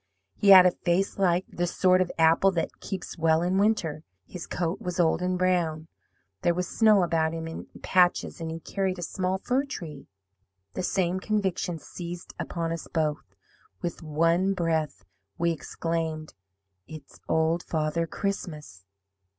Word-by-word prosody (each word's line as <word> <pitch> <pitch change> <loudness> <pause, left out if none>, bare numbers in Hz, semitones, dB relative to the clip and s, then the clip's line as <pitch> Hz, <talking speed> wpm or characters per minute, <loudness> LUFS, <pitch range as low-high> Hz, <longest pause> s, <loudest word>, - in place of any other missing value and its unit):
He 205 - +2
had 185 -2 +10
a 180 - +6
face 180 +3 -1
like 180 -1 +2
the 175 0 -2
sort 185 +1 +3
of 180 - 0
apple 165 +4 +5
that 165 -2 -3
keeps 185 -3 -6
well 160 0 +3
in 185 +2 +1
winter; 180 -8 +1 0.2
his 180 -2 -8
coat 175 0 -2
was 180 0 -4
old 165 0 +3
and 180 0 0
brown. 170 -3 0 0.5
There 170 - +2
was 180 0 -1
snow 215 -4 +4
about 165 -1 0
him 165 0 -5
in 165 - -7 0.2
patches, 180 -2 +2
and 165 - -3
he 165 0 -5
carried 190 0 -2
a 175 - -5
small 185 +2 -1
fir 255 +7 0
tree. 155 - -8 0.7
"The - - -3
same 185 0 0
conviction 190 -4 -1
seized 170 +2 -8
upon 165 -1 -3
us 165 -1 -5
both. 155 -2 -2 0.5
With 170 0 -4
one 165 +5 +1
breath, 160 -5 -1 0.3
we 170 0 +1
exclaimed, 160 0 -3 0.5
'IT'S 155 -3 -12
OLD 160 +1 +2
FATHER 160 +1 -1
CHRISTMAS!' 155 - -5
170 Hz, 155 wpm, -27 LUFS, 160-185 Hz, 0.7 s, had